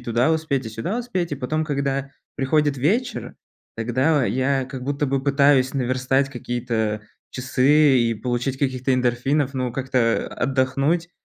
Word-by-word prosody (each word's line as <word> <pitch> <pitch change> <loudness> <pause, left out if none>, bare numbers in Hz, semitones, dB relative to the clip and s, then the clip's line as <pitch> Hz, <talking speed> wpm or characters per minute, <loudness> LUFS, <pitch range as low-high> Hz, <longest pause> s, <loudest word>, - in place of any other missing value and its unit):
туда 120 +5 +1
успеть, 155 -5 -1
и 110 - -6
сюда 145 - -3
успеть. 185 -10 -3
И - - +1
потом, 155 +4 -2
когда 140 -2 -2 0.3
приходит 145 0 +1
вечер, 220 - -1 0.4
тогда 130 +5 +1
я 130 +2 0
как 130 -1 -8
будто 145 +2 -1
бы 135 -1 -1
пытаюсь 140 -1 +3
наверстать 130 +1 0
какие-то 115 -4 -2 0.3
часы 135 +2 +3
и 115 -1 +1
получить 125 +4 -2
каких-то 130 -1 0
эндорфинов, 130 +3 +1
но 125 -2 -2
как-то 125 -3 0
отдохнуть 135 +6 0
135 Hz, 140 wpm, -22 LUFS, 125-145 Hz, 0.4 s, пытаюсь